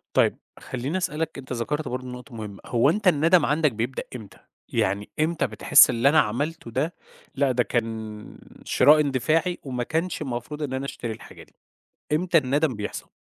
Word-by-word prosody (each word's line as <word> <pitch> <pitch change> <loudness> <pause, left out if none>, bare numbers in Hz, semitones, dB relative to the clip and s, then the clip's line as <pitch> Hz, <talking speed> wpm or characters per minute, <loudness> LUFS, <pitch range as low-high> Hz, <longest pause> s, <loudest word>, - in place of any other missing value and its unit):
طيب - - +3 0.2
خلّيني 130 +8 -4
أسألك، 160 -4 -2
أنت 130 -1 -7
ذكَرت 150 +5 -2
برضه 125 0 -4
نقطة 125 0 -9
مهمة. 105 -3 -7
هو 120 +3 +3
أنت 205 +4 0
الندم 165 0 +4
عَندك 150 0 +2
بيبدأ 115 +4 -3
إمتى، 110 -5 -10 0.3
يعني 105 -2 -1
إمتى 160 +2 +1
بتحس - - +6
اللي 120 +4 +3
أنا 155 +2 +5
عملته 135 +4 -2
ده، 145 +8 -1 0.4
لأ 140 -1 +2
ده 125 -1 +2
كان 110 -3 -4 0.3
شراء 150 +4 +5
إندفاعي 155 +5 +1
وما 125 -3 -3
كانش 165 +8 -2
المفروض 135 +4 -4
إن 135 -3 -3
أنا 130 +1 -3
أشتري 120 -4 -5
الحاجة 110 - -11
دي، - - -25 0.6
إمتى 170 +2 +3
الندم 145 0 +1
بيحصَل؟ 105 0 -6
135 Hz, 170 wpm, -25 LUFS, 120-155 Hz, 0.6 s, بتحس